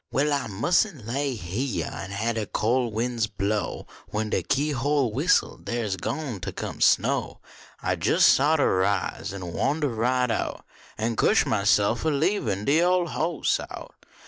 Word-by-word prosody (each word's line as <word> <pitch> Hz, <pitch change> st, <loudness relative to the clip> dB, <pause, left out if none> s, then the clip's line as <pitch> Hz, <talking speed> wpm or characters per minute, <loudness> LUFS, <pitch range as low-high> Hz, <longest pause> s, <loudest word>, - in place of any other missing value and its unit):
Well, 145 Hz, +2 st, +1 dB
I 140 Hz, -4 st, -1 dB
mus 115 Hz, -, +2 dB
n 160 Hz, -, -10 dB
lay 135 Hz, +3 st, -1 dB
heah 105 Hz, +5 st, -3 dB
An 95 Hz, -, -6 dB
hab 110 Hz, +4 st, -1 dB
de 110 Hz, -2 st, -3 dB
col 120 Hz, +3 st, 0 dB
win 120 Hz, +3 st, -2 dB
s 110 Hz, -, +2 dB
blow 105 Hz, -1 st, -2 dB, 0.2 s
When 105 Hz, 0 st, -3 dB
de -, -, +1 dB
keyhole 140 Hz, -3 st, 0 dB
whistles -, -, +1 dB
dar 120 Hz, 0 st, -2 dB
s 100 Hz, -3 st, -1 dB
gwine 115 Hz, -, -4 dB
ter -, -, -4 dB
come -, -, -6 dB
snow -, -, +2 dB, 0.4 s
I -, -, +1 dB
jes* -, -, +5 dB
oughter 145 Hz, -7 st, +3 dB
rise 95 Hz, -1 st, -1 dB
An 90 Hz, -3 st, -6 dB
wandah 145 Hz, +1 st, 0 dB
right 125 Hz, +2 st, +1 dB
out, -, -, -3 dB, 0.3 s
An 115 Hz, +1 st, -1 dB
cuah -, -, +4 dB
myself 105 Hz, +2 st, +2 dB
ob 160 Hz, -1 st, +1 dB
leebin 140 Hz, -, 0 dB
de 155 Hz, +4 st, +3 dB
ole 180 Hz, -1 st, +2 dB
hoss 165 Hz, +2 st, 0 dB
out. -, -, -9 dB
120 Hz, 170 wpm, -25 LUFS, 105-145 Hz, 0.4 s, jes